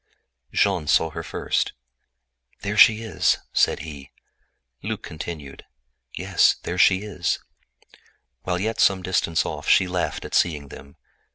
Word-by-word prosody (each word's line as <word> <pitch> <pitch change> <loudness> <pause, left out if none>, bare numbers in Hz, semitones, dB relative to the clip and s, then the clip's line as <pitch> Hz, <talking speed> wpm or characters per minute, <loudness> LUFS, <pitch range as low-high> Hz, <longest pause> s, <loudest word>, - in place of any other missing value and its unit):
Jean 95 -6 +1
saw 80 +1 +3
her - - -5
first. - - -2 0.9
"There 105 +1 -3
she 110 +1 +6
is!" 110 - +1 0.2
he 75 -3 0
cried. - - -37 0.6
Luc 105 -3 -5
added: 80 -3 -8 0.5
"Yes, - - +3
there 90 - -4
she 95 +1 +4
is." 95 -4 -2 1.0
While 90 -1 -2
yet 110 +3 -2
some 95 -1 +3
distance 90 -2 0
off - - -4
she 95 - +5
laughed 90 -1 -3
at - - -9
seeing 75 -5 +1
them. 70 +1 -13
90 Hz, 130 wpm, -23 LUFS, 80-100 Hz, 1.0 s, she